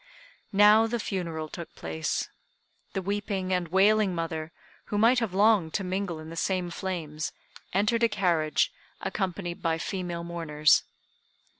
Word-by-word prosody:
Now 210 Hz, +2 st, +6 dB
the 235 Hz, +1 st, -2 dB
funeral 170 Hz, -6 st, -3 dB
took 170 Hz, +1 st, -9 dB
place. 80 Hz, -1 st, -2 dB, 0.7 s
The 190 Hz, -, -2 dB
weeping 200 Hz, -1 st, -2 dB
and 180 Hz, -1 st, 0 dB
wailing 195 Hz, +2 st, +4 dB
mother, 160 Hz, -1 st, -3 dB, 0.3 s
who 205 Hz, -, -3 dB
might 235 Hz, +4 st, +5 dB
have 220 Hz, -6 st, -2 dB
longed 200 Hz, -5 st, +4 dB
to 195 Hz, -, 0 dB
mingle 185 Hz, -2 st, -2 dB
in 155 Hz, +1 st, -9 dB
the -, -, -7 dB
same 180 Hz, +1 st, -1 dB
flames, 160 Hz, -5 st, -4 dB, 0.4 s
entered 210 Hz, +5 st, +2 dB
a 230 Hz, -, +4 dB
carriage, 175 Hz, -, +1 dB, 0.3 s
accompanied 180 Hz, -3 st, -3 dB
by 165 Hz, -1 st, +1 dB
female 175 Hz, -1 st, -4 dB
mourners. 160 Hz, -3 st, +3 dB
185 Hz, 140 wpm, -28 LUFS, 165-205 Hz, 0.7 s, Now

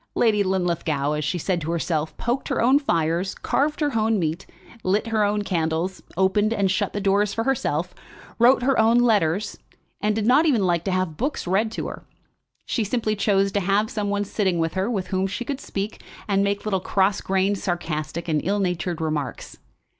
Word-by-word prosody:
Lady 215 Hz, -3 st, +3 dB
Linlithgow, 170 Hz, -6 st, 0 dB
as 150 Hz, 0 st, -1 dB
she 160 Hz, +5 st, -1 dB
had 170 Hz, -, -7 dB
said 175 Hz, -4 st, 0 dB
of 160 Hz, -, -4 dB
herself, 160 Hz, -2 st, -2 dB
poked 240 Hz, +3 st, -2 dB
her -, -, -1 dB
own 260 Hz, +5 st, +5 dB
fires, 170 Hz, -, 0 dB
carved 300 Hz, +4 st, 0 dB
her 290 Hz, -5 st, 0 dB
own 220 Hz, 0 st, +2 dB
meat, 165 Hz, 0 st, -2 dB, 0.4 s
lit 195 Hz, +4 st, +1 dB
her 220 Hz, -2 st, +2 dB
own 205 Hz, 0 st, +1 dB
candles, 170 Hz, 0 st, -1 dB, 0.2 s
opened 205 Hz, +3 st, +2 dB
and 200 Hz, -4 st, +1 dB
shut 190 Hz, -, -1 dB
the 205 Hz, -, -2 dB
doors 200 Hz, +1 st, +1 dB
for 225 Hz, -, 0 dB
herself, 180 Hz, -, -1 dB, 0.5 s
wrote 245 Hz, +2 st, +5 dB
her 270 Hz, -1 st, +2 dB
own 225 Hz, +2 st, +5 dB
letters, 205 Hz, -5 st, +2 dB, 0.4 s
and 210 Hz, 0 st, +1 dB
did 215 Hz, -1 st, -1 dB
not 275 Hz, +7 st, +5 dB
even 235 Hz, -10 st, +3 dB
like 170 Hz, -2 st, +1 dB
to 195 Hz, -, 0 dB
have 185 Hz, -4 st, -1 dB
books 275 Hz, +4 st, -2 dB
read 200 Hz, +5 st, +1 dB
to -, -, -4 dB
her. -, -, -8 dB, 0.6 s
She 230 Hz, -, -1 dB
simply 215 Hz, 0 st, -1 dB
chose 195 Hz, -1 st, +2 dB
to 200 Hz, -, +1 dB
have 200 Hz, +3 st, +1 dB
some 205 Hz, -2 st, -2 dB
one 205 Hz, 0 st, 0 dB
sitting 190 Hz, -3 st, 0 dB
with 165 Hz, -1 st, 0 dB
her 190 Hz, +2 st, -1 dB
to 215 Hz, -6 st, 0 dB
whom 190 Hz, 0 st, 0 dB
she 210 Hz, +5 st, -4 dB
could 275 Hz, +1 st, -4 dB
speak 200 Hz, +2 st, -5 dB, 0.3 s
and 200 Hz, -1 st, +2 dB
make 200 Hz, +1 st, -1 dB
little 195 Hz, -3 st, 0 dB
cross 190 Hz, +2 st, +1 dB
grained, 195 Hz, +1 st, +1 dB
sarcastic, 165 Hz, -2 st, -3 dB
and 155 Hz, -2 st, +1 dB
ill 200 Hz, +3 st, 0 dB
natured 180 Hz, -3 st, -2 dB
remarks. 155 Hz, -4 st, -4 dB
195 Hz, 200 wpm, -23 LUFS, 175-215 Hz, 0.6 s, own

